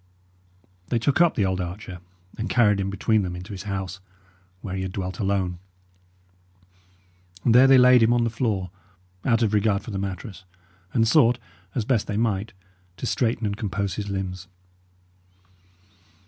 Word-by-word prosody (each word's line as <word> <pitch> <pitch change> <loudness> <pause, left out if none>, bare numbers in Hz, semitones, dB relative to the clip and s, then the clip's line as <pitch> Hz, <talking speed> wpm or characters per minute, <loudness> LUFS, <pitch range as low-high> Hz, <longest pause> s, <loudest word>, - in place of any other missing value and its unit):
They 120 - 0
took 140 +8 +1
up 170 -2 +4
the 105 - +1
old 95 0 -1
archer, 90 +1 -7 0.4
and 115 - -4
carried 105 -5 +3
him 95 0 -1
between 105 +3 +1
them 90 -2 -4
into 90 +4 -8
his 95 +1 -7
house, 95 0 -4 0.6
where 95 -3 -5
he 95 - -3
had 95 -1 -4
dwelt 95 +2 -4
alone. 95 -4 -1 1.9
And 115 - +4
there 130 +3 +7
they 135 0 +7
laid 125 -1 +7
him 115 +1 +4
on 120 -1 +3
the 115 - 0
floor, 105 -6 -2 0.5
out 120 -2 +3
of 110 -2 +1
regard 105 -1 +2
for 115 - -8
the 95 - -3
mattress, 95 0 -6 0.5
and 115 -2 +2
sought, 125 -3 +4 0.4
as 115 - -1
best 120 -4 +1
they 105 - -2
might, 110 -1 0 0.5
to - - -5
straighten 120 -2 0
and 100 -1 -1
compose 100 -2 -3
his 100 +1 -4
limbs. 95 -2 -4
105 Hz, 165 wpm, -24 LUFS, 95-115 Hz, 1.9 s, there